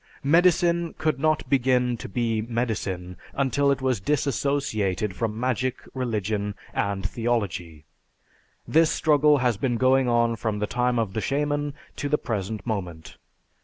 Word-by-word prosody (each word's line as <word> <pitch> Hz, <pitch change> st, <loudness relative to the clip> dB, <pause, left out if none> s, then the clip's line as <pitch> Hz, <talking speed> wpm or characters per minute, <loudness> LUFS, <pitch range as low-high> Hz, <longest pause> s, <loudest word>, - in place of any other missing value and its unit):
Medicine 170 Hz, +2 st, +3 dB
could 155 Hz, -4 st, 0 dB
not 155 Hz, +1 st, +1 dB
begin 125 Hz, -2 st, +2 dB
to -, -, -8 dB
be 115 Hz, +1 st, 0 dB
medicine 110 Hz, -6 st, -3 dB, 0.2 s
until 140 Hz, +1 st, +1 dB
it 135 Hz, -1 st, 0 dB
was 130 Hz, -5 st, +1 dB
disassociated 120 Hz, -, 0 dB
from 110 Hz, -1 st, -2 dB
magic, 130 Hz, 0 st, -1 dB
religion, 105 Hz, -5 st, -2 dB, 0.2 s
and 100 Hz, -2 st, -1 dB
theology. 95 Hz, -10 st, -2 dB, 0.8 s
This 160 Hz, 0 st, +4 dB
struggle 150 Hz, -1 st, +4 dB
has 125 Hz, -5 st, +1 dB
been 120 Hz, +2 st, 0 dB
going 130 Hz, +1 st, +3 dB
on 115 Hz, -1 st, +2 dB
from 110 Hz, -2 st, -2 dB
the 105 Hz, -, 0 dB
time 125 Hz, +2 st, 0 dB
of 110 Hz, -5 st, -1 dB
the 110 Hz, -, -2 dB
"shaman" 145 Hz, +1 st, -1 dB, 0.2 s
to 145 Hz, -, -2 dB
the 150 Hz, -, +3 dB
present 110 Hz, -3 st, -4 dB
moment. 90 Hz, -8 st, -5 dB
120 Hz, 140 wpm, -25 LUFS, 105-140 Hz, 0.8 s, This